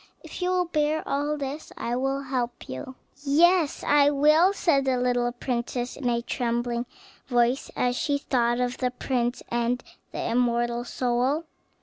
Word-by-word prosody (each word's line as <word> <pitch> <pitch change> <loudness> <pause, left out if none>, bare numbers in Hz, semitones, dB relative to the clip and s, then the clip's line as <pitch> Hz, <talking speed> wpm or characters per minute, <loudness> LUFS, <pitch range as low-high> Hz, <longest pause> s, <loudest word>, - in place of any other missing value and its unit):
If - - -9
you 360 - +1
will 365 -1 +2
bear 310 -2 0
all 290 +2 -1
this, 285 +2 -5
I 235 +1 -2
will 270 +2 -1
help 250 -3 -3
you." 130 - -7 0.3
"Yes, 325 +2 +3
I 290 -1 +5
will," 305 +6 +5
said 300 -8 +2
the 260 -1 +2
little 245 -1 +1
princess 240 0 -3
in 255 -3 -2
a 235 0 0
trembling 240 0 -2 0.4
voice, 245 +1 +1
as 245 0 +1
she 285 -1 0
thought 240 -3 +1
of 250 0 -1
the 255 - +1
prince 245 -1 -2
and 240 +1 0 0.3
the - - -4
immortal 240 0 +1
soul. 250 +6 0
250 Hz, 155 wpm, -26 LUFS, 240-290 Hz, 0.4 s, I